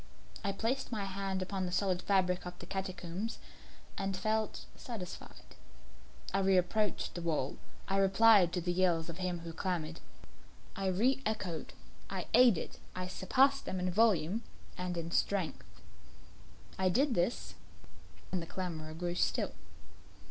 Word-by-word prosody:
I 200 Hz, -, +1 dB
placed 230 Hz, +8 st, -1 dB
my 210 Hz, -4 st, -1 dB
hand 195 Hz, -1 st, -2 dB
upon 190 Hz, -1 st, -2 dB
the -, -, -4 dB
solid 185 Hz, -1 st, +1 dB
fabric 185 Hz, -2 st, +2 dB
of 180 Hz, -, -7 dB
the -, -, -9 dB
catacombs, 190 Hz, +2 st, -4 dB, 0.6 s
and 195 Hz, -1 st, -1 dB
felt 215 Hz, +1 st, -1 dB
satisfied. 220 Hz, -8 st, -8 dB, 0.8 s
I 195 Hz, -, +3 dB
reapproached 195 Hz, +2 st, +2 dB
the 175 Hz, -, -5 dB
wall; 155 Hz, -5 st, -1 dB, 0.3 s
I 195 Hz, -, +1 dB
replied 195 Hz, -1 st, +6 dB
to 180 Hz, -, 0 dB
the 175 Hz, +1 st, 0 dB
yells 175 Hz, -3 st, +2 dB
of 170 Hz, +2 st, -7 dB
him 180 Hz, -2 st, -1 dB
who 165 Hz, 0 st, -7 dB
clamoured. 165 Hz, -3 st, -2 dB, 0.8 s
I 195 Hz, 0 st, -1 dB
re 235 Hz, +9 st, +2 dB
echoed 190 Hz, -, -3 dB, 0.4 s
I -, -, -3 dB
aided 245 Hz, -9 st, +5 dB, 0.2 s
I 185 Hz, 0 st, -2 dB
surpassed 270 Hz, +9 st, +3 dB
them 185 Hz, -, -2 dB
in 180 Hz, 0 st, 0 dB
volume 200 Hz, -1 st, +3 dB, 0.3 s
and 180 Hz, -1 st, -3 dB
in 165 Hz, 0 st, -3 dB
strength. 190 Hz, -2 st, -1 dB, 1.0 s
I 190 Hz, -1 st, +3 dB
did 270 Hz, +8 st, +3 dB
this, 90 Hz, -, 0 dB, 0.8 s
and 185 Hz, -1 st, 0 dB
the 165 Hz, -, -7 dB
clamourer 160 Hz, -4 st, -4 dB
grew 175 Hz, +1 st, -2 dB
still. -, -, 0 dB
185 Hz, 140 wpm, -33 LUFS, 175-200 Hz, 1.0 s, replied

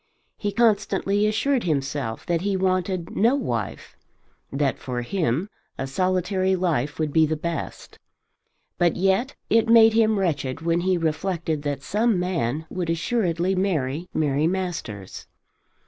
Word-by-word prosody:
He 205 Hz, -, -3 dB
constantly 205 Hz, -2 st, +2 dB
assured 240 Hz, +4 st, +1 dB
himself 140 Hz, -6 st, -2 dB
that 170 Hz, -1 st, 0 dB
he 195 Hz, 0 st, 0 dB
wanted 185 Hz, -2 st, -1 dB
no 235 Hz, +6 st, +4 dB
wife, 115 Hz, -, -4 dB, 0.6 s
that 140 Hz, 0 st, 0 dB
for 125 Hz, -2 st, -4 dB
him 165 Hz, -, -1 dB, 0.3 s
a 135 Hz, -, -2 dB
solitary 185 Hz, +5 st, 0 dB
life 165 Hz, -5 st, -1 dB
would 155 Hz, -2 st, -2 dB
be 160 Hz, -1 st, +5 dB
the 155 Hz, -, -1 dB
best. 170 Hz, +1 st, -5 dB, 0.8 s
But 175 Hz, -2 st, +3 dB
yet 195 Hz, +8 st, +1 dB
it 225 Hz, 0 st, +3 dB
made 225 Hz, -1 st, +7 dB
him 220 Hz, -1 st, +3 dB
wretched 150 Hz, -7 st, -1 dB
when 165 Hz, +1 st, +1 dB
he 185 Hz, 0 st, +1 dB
reflected 165 Hz, -1 st, -1 dB
that 145 Hz, -2 st, -3 dB
some 215 Hz, -1 st, +1 dB
man 160 Hz, -5 st, -1 dB
would 175 Hz, 0 st, -4 dB
assuredly 175 Hz, 0 st, 0 dB
marry 175 Hz, -4 st, -1 dB
Mary 150 Hz, 0 st, +1 dB
Masters. 165 Hz, -, -4 dB
175 Hz, 135 wpm, -24 LUFS, 150-195 Hz, 0.8 s, made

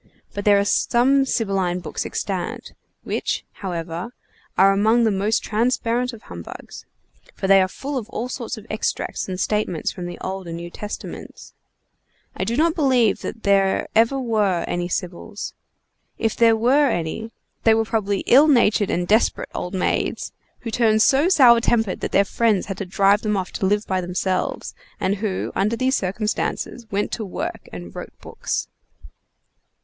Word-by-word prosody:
But 205 Hz, -, -5 dB
there 205 Hz, -1 st, +6 dB
are 200 Hz, -, +2 dB
some 265 Hz, +6 st, +3 dB
Sibylline 195 Hz, -8 st, 0 dB
books -, -, -4 dB
extant, -, -, -4 dB, 0.3 s
which, -, -, -2 dB, 0.2 s
however, 170 Hz, +1 st, -4 dB, 0.5 s
are 195 Hz, +1 st, +6 dB
among 220 Hz, +4 st, +3 dB
the 220 Hz, -, +3 dB
most 205 Hz, +3 st, 0 dB
transparent 240 Hz, +2 st, 0 dB
of 230 Hz, -3 st, -12 dB
humbugs, 85 Hz, -1 st, -10 dB, 0.5 s
for -, -, -4 dB
they 195 Hz, 0 st, +6 dB
are 185 Hz, -, +2 dB
full 270 Hz, +8 st, -4 dB
of 225 Hz, -1 st, -10 dB
all 245 Hz, 0 st, -3 dB
sorts 250 Hz, -1 st, -5 dB
of 215 Hz, -, -11 dB
extracts 215 Hz, -2 st, -3 dB
and 185 Hz, -1 st, -4 dB
statements 210 Hz, -5 st, -1 dB
from 175 Hz, -1 st, -6 dB
the 175 Hz, -, -7 dB
Old 190 Hz, -1 st, -5 dB
and 165 Hz, 0 st, -5 dB
New 170 Hz, 0 st, -7 dB
Testaments. 210 Hz, +3 st, -8 dB, 0.8 s
I -, -, -2 dB
do 235 Hz, +2 st, -1 dB
not 325 Hz, +2 st, +3 dB
believe 260 Hz, -, +2 dB
there 200 Hz, -3 st, +1 dB
ever 230 Hz, +5 st, +4 dB
were 210 Hz, -8 st, +1 dB
any 175 Hz, 0 st, -2 dB
Sibyls. 180 Hz, +3 st, -5 dB, 0.6 s
If 225 Hz, -1 st, 0 dB
there 230 Hz, -1 st, +5 dB
were 260 Hz, +6 st, +3 dB
any, 175 Hz, +4 st, -3 dB, 0.3 s
they 225 Hz, -1 st, +5 dB
were 225 Hz, 0 st, +1 dB
probably 205 Hz, -3 st, -1 dB
ill 280 Hz, +5 st, +6 dB
natured 225 Hz, -7 st, +3 dB
and 175 Hz, 0 st, -1 dB
desperate 220 Hz, +4 st, +2 dB
old 180 Hz, +2 st, -4 dB
maids, 185 Hz, -, -1 dB, 0.3 s
who 230 Hz, -, -5 dB
turned 220 Hz, -2 st, +3 dB
so 285 Hz, +5 st, +4 dB
sour 245 Hz, -9 st, +6 dB
tempered 225 Hz, -5 st, +1 dB
that -, -, -4 dB
their 200 Hz, -, +4 dB
friends 215 Hz, -1 st, +1 dB
had 195 Hz, -, -5 dB
to 195 Hz, -, -4 dB
drive 200 Hz, +3 st, +3 dB
them 210 Hz, -2 st, 0 dB
off 185 Hz, -1 st, -3 dB
to 190 Hz, -, -1 dB
live 205 Hz, +2 st, +1 dB
by 185 Hz, -1 st, -1 dB
themselves, 185 Hz, +1 st, -2 dB, 0.3 s
and 195 Hz, +2 st, 0 dB
who, 195 Hz, -2 st, -2 dB
under 210 Hz, +4 st, +1 dB
these 260 Hz, +3 st, +1 dB
circumstances, 215 Hz, +4 st, -2 dB
went 205 Hz, +1 st, -1 dB
to 225 Hz, -, -3 dB
work 195 Hz, -, -5 dB
and 85 Hz, -1 st, -9 dB
wrote -, -, -9 dB
books. -, -, -4 dB
210 Hz, 165 wpm, -22 LUFS, 190-235 Hz, 0.8 s, there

